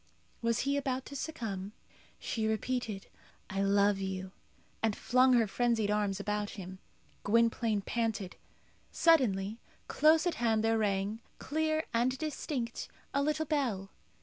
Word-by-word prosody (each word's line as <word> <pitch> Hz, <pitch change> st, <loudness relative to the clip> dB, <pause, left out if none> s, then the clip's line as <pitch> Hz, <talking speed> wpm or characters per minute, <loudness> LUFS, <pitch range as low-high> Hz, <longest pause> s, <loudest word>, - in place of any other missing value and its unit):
Was 230 Hz, -1 st, +1 dB
he 280 Hz, +1 st, +1 dB
about 265 Hz, -2 st, -2 dB
to 280 Hz, -, -9 dB
succumb? 215 Hz, -10 st, -4 dB, 0.4 s
She 220 Hz, -1 st, -2 dB
repeated, 220 Hz, -2 st, -2 dB, 0.5 s
"I 195 Hz, +1 st, -1 dB
love 200 Hz, 0 st, +3 dB
you!" 190 Hz, -1 st, -4 dB, 0.5 s
and 220 Hz, -2 st, +1 dB
flung 255 Hz, +1 st, +4 dB
her 235 Hz, -2 st, +5 dB
frenzied 225 Hz, -1 st, +1 dB
arms 205 Hz, -2 st, 0 dB
around 210 Hz, 0 st, -2 dB
him. 190 Hz, -1 st, -8 dB, 0.4 s
Gwynplaine 230 Hz, -1 st, +2 dB
panted. 220 Hz, -4 st, -2 dB, 0.6 s
Suddenly 225 Hz, -, +3 dB, 0.3 s
close 315 Hz, +2 st, +4 dB
at 350 Hz, -, +1 dB
hand 220 Hz, -2 st, +2 dB
there 225 Hz, 0 st, +2 dB
rang, 205 Hz, +1 st, 0 dB, 0.2 s
clear 315 Hz, +1 st, 0 dB
and 245 Hz, +3 st, +2 dB
distinct, 275 Hz, -5 st, -3 dB, 0.3 s
a 280 Hz, -, +2 dB
little 305 Hz, +2 st, 0 dB
bell. 240 Hz, -11 st, -1 dB
225 Hz, 130 wpm, -32 LUFS, 200-260 Hz, 0.6 s, her